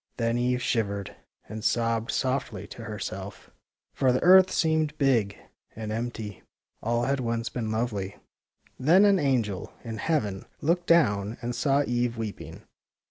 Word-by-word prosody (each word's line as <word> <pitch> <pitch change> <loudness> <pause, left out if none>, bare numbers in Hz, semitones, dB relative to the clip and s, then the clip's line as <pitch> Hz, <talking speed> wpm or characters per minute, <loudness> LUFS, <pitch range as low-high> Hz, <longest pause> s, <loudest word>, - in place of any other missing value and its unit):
Then 115 0 0
Eve 125 0 0
shivered 100 -4 -1 0.3
and 110 0 -7
sobbed 115 -1 +1
softly 130 +1 -1
to 115 - -10
her 105 -1 -5
self, 95 0 -7 0.4
for 130 -2 +2
the 125 - 0
earth 185 +1 +8
seemed 160 -2 +1
big 115 -8 +2 0.4
and 110 -1 -5
empty. 110 -3 -4 0.4
All 120 +1 0
had 135 +2 0
once 115 -2 -2
been 115 -3 -3
lovely. 105 -3 -2 0.6
Then 175 +10 +5
an 200 -2 +5
angel 115 - 0
in 115 -2 -5
heaven 105 -9 -1
looked 175 +3 0
down 105 -10 +3
and 120 +1 -2
saw 140 +3 +2
Eve 120 -1 -1
weeping. 100 -8 -6
120 Hz, 145 wpm, -27 LUFS, 110-135 Hz, 0.6 s, earth